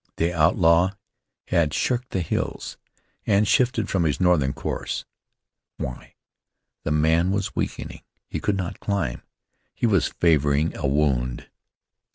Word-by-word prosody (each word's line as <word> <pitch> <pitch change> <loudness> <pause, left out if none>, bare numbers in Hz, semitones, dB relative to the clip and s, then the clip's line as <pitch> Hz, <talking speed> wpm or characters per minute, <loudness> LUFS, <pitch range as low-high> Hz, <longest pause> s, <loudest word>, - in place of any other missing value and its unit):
The 85 +2 0
outlaw 85 +2 +4 0.6
had 85 -4 +2
shirked 125 0 0
the 95 - -1
hills, 80 - -3 0.5
and 105 0 +3
shifted 120 -3 +2
from 95 -5 +1
his 75 -2 0
northern 85 -7 +3
course. - - -4 0.7
Why? 60 - -7 0.7
The - - -3
man 80 +3 +3
was 100 0 -2
weakening; - - -4 0.3
he - - -4
could 100 -2 0
not 90 -2 -4
climb; 95 - -2 0.5
he - - -1
was 100 -9 +3
favoring 75 -2 +2
a 75 - -1
wound. 65 -4 0
85 Hz, 130 wpm, -24 LUFS, 75-95 Hz, 0.7 s, outlaw